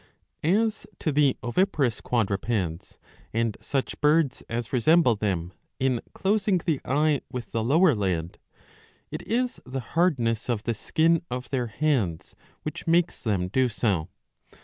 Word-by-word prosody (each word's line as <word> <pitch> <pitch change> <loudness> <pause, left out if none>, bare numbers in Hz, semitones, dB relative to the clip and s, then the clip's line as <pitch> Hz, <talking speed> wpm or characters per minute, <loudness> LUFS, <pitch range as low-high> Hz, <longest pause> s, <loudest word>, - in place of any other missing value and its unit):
* - - -47 0.2
As 220 - -5
to 155 - -1
the 140 -2 +3
oviparous 130 - +1
quadrupeds, 100 -5 -1 0.4
and 115 -2 +1
such 135 -2 -2
birds 150 -2 +3
as 115 +1 -4
resemble 130 0 +4
them 95 -4 -2 0.3
in 130 -3 +1
closing 200 -1 +1
the 160 -5 -1
eye 145 +1 +2
with 120 -4 -6
the 115 -1 -1
lower 155 +7 +4
lid, 90 -6 -2 0.7
it - - -4
is 245 +2 -1
the 130 +1 -4
hardness 125 -10 +1
of 115 -3 0
the 115 - 0
skin 165 +9 +2
of 125 +1 -5
their 125 -3 0
heads 110 - -1 0.3
which 155 - -6
makes 170 +1 +2
them 100 -6 0
do 130 +6 +2
so. 100 -8 0
125 Hz, 145 wpm, -26 LUFS, 110-155 Hz, 0.7 s, resemble